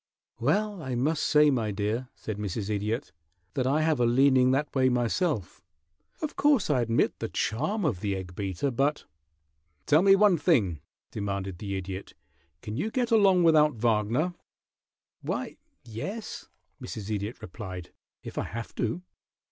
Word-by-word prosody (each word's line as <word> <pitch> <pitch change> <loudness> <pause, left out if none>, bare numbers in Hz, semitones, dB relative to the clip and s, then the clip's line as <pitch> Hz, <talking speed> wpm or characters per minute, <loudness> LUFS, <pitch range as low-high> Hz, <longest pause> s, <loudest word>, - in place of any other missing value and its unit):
"Well, 200 - 0
I 130 -4 -3
must 145 +5 +1
say, 150 0 +5
my 115 -5 0
dear," 105 +5 -2
said 105 -2 -6
Mrs. 105 +1 -3
Idiot, 110 +6 -2 0.4
"that 130 -2 0
I 150 +4 +2
have 155 -4 +2
a 120 - +4
leaning 130 +1 +5
that 140 +3 0
way 130 -1 +3
myself. 125 - -1 0.6
Of 310 - -3
course, 285 - +3
I 130 -4 +3
admit 115 0 +1
the - - -3
charm 165 - -1
of 115 -12 0
the 100 0 -1
egg 90 -1 -6
beater, 100 +8 -2
but 140 +5 0 0.4
" 75 0 -46
"Tell 155 - +5
me 195 +1 +7
one 195 -4 +4
thing," 100 - +2 0.3
demanded 100 -3 -4
the 100 -2 -4
Idiot. 95 0 -6 0.5
"Can 105 +1 -5
you 185 +10 -1
get 245 +1 -1
along 195 -5 +5
without 155 -3 +5
Wagner?" 115 +8 +1 0.9
"Why, - - -4 0.3
yes," 190 - -6 0.3
Mrs. 110 -1 -6
Idiot 105 +3 -4
replied, 90 -3 -8 0.3
"if - - -5
I - - -2
have 115 +1 -6
to." 125 +9 -1
120 Hz, 155 wpm, -28 LUFS, 105-155 Hz, 0.9 s, me